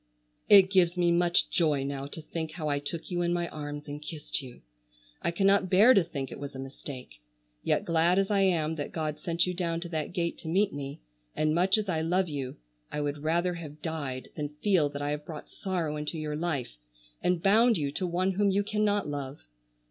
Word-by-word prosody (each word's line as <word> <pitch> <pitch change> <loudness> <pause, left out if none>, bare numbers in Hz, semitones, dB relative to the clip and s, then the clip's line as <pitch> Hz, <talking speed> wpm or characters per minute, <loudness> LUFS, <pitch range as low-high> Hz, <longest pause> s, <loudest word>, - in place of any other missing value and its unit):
It 195 -2 +8
gives 180 -2 +4
me 175 -1 +3
much 175 0 +3
joy 150 -5 +2
now 140 0 -4
to 155 +2 -8
think 160 0 -5
how 160 -3 -4
I 145 -1 +1
took 160 +5 -5
you 175 0 0
in 175 0 +1
my 175 0 0
arms 145 -1 -6
and 145 +1 -6
kissed 150 -1 -4
you. 125 -3 -12 0.6
I - - 0
cannot 195 +2 +3
bear 210 +8 +7
to 195 - +5
think 140 -5 -5
it - - -7
was 140 -1 -7
a - - -5
mistake. 130 - -8 0.4
Yet - - +1
glad 170 +2 +3
as 195 +1 +2
I 200 - +3
am 160 -4 +2
that 145 - -4
God 155 -2 -2
sent 170 +2 +1
you 180 - -2
down 170 -2 -1
to 175 - -5
that 155 -3 -3
gate 170 -1 -2
to - - -9
meet 195 +5 +2
me, 140 -1 -6 0.3
and 155 0 +1
much 185 +5 +3
as 215 -1 -2
I 165 -4 0
love 180 +3 +1
you, 140 -4 -4 0.3
I - - -3
would 145 0 -2
rather 170 +4 +1
have 155 -3 -9
died 145 -6 -4
than 150 -1 -4
feel 180 -8 +3
that 145 0 -5
I 145 - -1
have 150 0 -3
brought 155 -1 -9
sorrow 170 -6 -2
into 150 +2 -4
your 155 -1 -3
life, 145 - -3 0.4
and 180 -1 +2
bound 225 +4 +5
you 145 -3 -1
to 180 +5 -2
one 180 +2 +1
whom 200 +2 +2
you 200 +1 +2
cannot 205 -2 +1
love. 140 -1 -5
165 Hz, 220 wpm, -29 LUFS, 145-180 Hz, 0.6 s, It